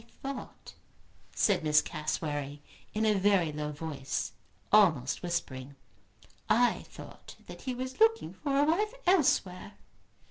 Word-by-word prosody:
"I - - -22 0.3
thought," 255 - -11 0.6
said 200 -6 +2
Miss 150 -1 +5
Cassewary, 150 -2 -3 0.3
in 220 +1 0
a 215 - +4
very 195 -5 +2
low 150 0 -4
voice, 145 -2 -4 0.4
almost 165 -12 +4
whispering, 140 -6 -4 0.7
"I 240 +3 +3
thought - - -12
that - - -11
he 255 -2 -3
was 255 +1 -6
looking 450 0 +3
for 280 -2 -3
a 285 - +5
wife 410 +10 +1
elsewhere." 230 - +2
185 Hz, 130 wpm, -30 LUFS, -, 0.7 s, Miss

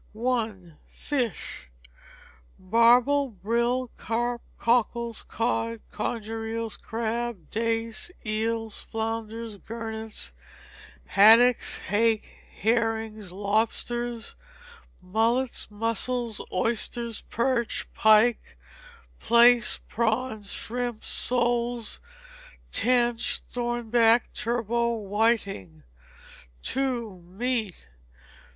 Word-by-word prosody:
i. 235 -3 0 0.3
Fish. 245 - -4 0.9
Barbel, 240 +7 +4
brill, 235 +4 -1
carp, 235 +1 -2 0.2
cockles, 235 -1 +1
cod, 230 0 -2
conger 225 +1 -3
eels, 225 0 -3
crab, 230 -4 -4
dace, 225 +3 -1 0.2
eels, 225 0 -2
flounders, 225 0 -4
gurnets, 220 0 -5 0.7
haddocks, 225 +4 +6
hake, 220 +1 +1 0.2
herrings, 220 -3 -1
lobsters, 225 +4 -1 0.7
mullet, 230 +7 +1
mussels, 230 +2 -1
oysters, 230 +3 -1
perch, 235 0 -1
pike, 220 +2 +4 0.6
plaice, 235 +1 +5
prawns, 220 -2 -1
shrimps, 240 -1 -3
soles, 240 -1 +1 0.7
tench, 240 -1 +2
thornback, 240 -1 +2
turbot, 235 0 0
whiting. 200 - -1 0.9
ii. 270 - +1 0.2
Meat. 210 +2 -4
230 Hz, 70 wpm, -26 LUFS, 220-240 Hz, 0.9 s, haddocks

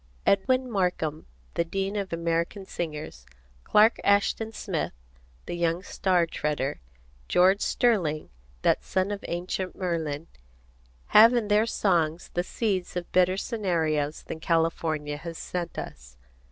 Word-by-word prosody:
Edwin 255 +6 +3
Markham, 180 -8 -1 0.3
the - - +1
dean 195 +4 -3
of 200 -2 -3
American 170 +3 -1
singers, 150 - -6 0.4
Clark 215 - +5
Ashton 205 +2 +2
Smith, 190 -7 -3 0.5
the - - -5
young 170 +1 0
star 180 -4 +1
treader, 150 -3 -2 0.5
George 190 +3 +4
Sterling, 175 -11 +1 0.3
that - - +3
son 190 +2 0
of 205 - -4
Ancient 180 +1 -3
Merlin, 165 -4 -2 0.8
have 225 +3 +8
in 225 -3 0
their 210 +2 +4
songs 170 -6 0
the 175 - +1
seeds 190 -3 -2
of 180 -1 -4
better 185 +1 +3
scenarios 160 - -1
than 160 - -6
California 160 -3 0
has 165 +1 -7
sent 175 -1 -4
us. 60 +1 -8
175 Hz, 125 wpm, -27 LUFS, 160-200 Hz, 0.8 s, have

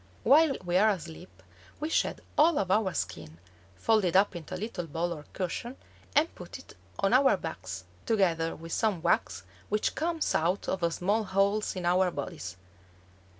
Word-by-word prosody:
While 290 +2 +5
we 175 +1 +2
are 215 +3 +5
asleep 175 -2 -6 0.4
we 305 - -2
shed - - 0
all 315 +2 +5
of 190 -2 0
our 200 -1 +3
skin, 80 -4 -4 0.4
fold 220 -2 +2
it 180 -2 0
up 195 0 +4
into 165 -3 -6
a - - -4
little 180 -4 -4
ball 170 +3 -2
or 150 -3 -10
cushion 215 +7 -4 0.4
and 310 +3 +3
put - - -9
it - - -15 0.2
on 195 +3 +1
our 265 +1 +5
backs, - - -6 0.2
together 170 -7 +1
with 165 +1 -10
some 205 -7 0
wax - - +1 0.3
which 210 +1 0
comes 330 0 -1
out 175 +5 0
of 170 -3 0
small 205 +6 0
holes 200 +2 +1
in 180 -2 -4
our 180 +1 +3
bodies. 90 - -6
190 Hz, 170 wpm, -29 LUFS, 170-220 Hz, 0.4 s, While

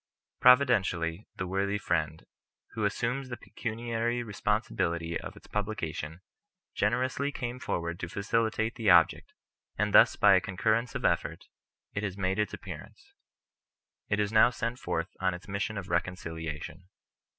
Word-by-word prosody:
Providentially 105 -9 +4
the 95 - -3
worthy 100 +2 0
friend, 80 -5 -1 0.5
who 110 -2 -1
assumes 125 +6 -1
the 120 - -5
pecuniary 115 +1 -3
responsibility 95 -6 -1
of - - -8
its - - -15
publica 105 -6 -3
tion, 80 +2 -6 0.5
generously 130 +6 0
came 125 -2 -4
forward 85 -6 -3
to 85 - -4
facilitate 110 +3 0
the 115 -4 0
object, 85 -2 +5 0.5
and - - 0
thus - - +7
by 105 -1 +6
a 95 - +5
concurrence 110 +6 0
of - - -3
effort, - - 0 0.5
it 100 - -2
has 100 -2 -3
made 95 +1 0
its 105 - +1
ap - - -8
pearance. 85 -7 -10 1.0
It 105 - +1
is 105 0 +1
now 110 +2 +6
sent 125 0 -3
forth 85 -5 -3
on 95 -1 +1
its 90 - -12
mission 100 +2 -2
of 95 -2 -5
recon 90 -2 0
ciliation. 80 -1 -6
100 Hz, 150 wpm, -29 LUFS, 85-115 Hz, 1.0 s, thus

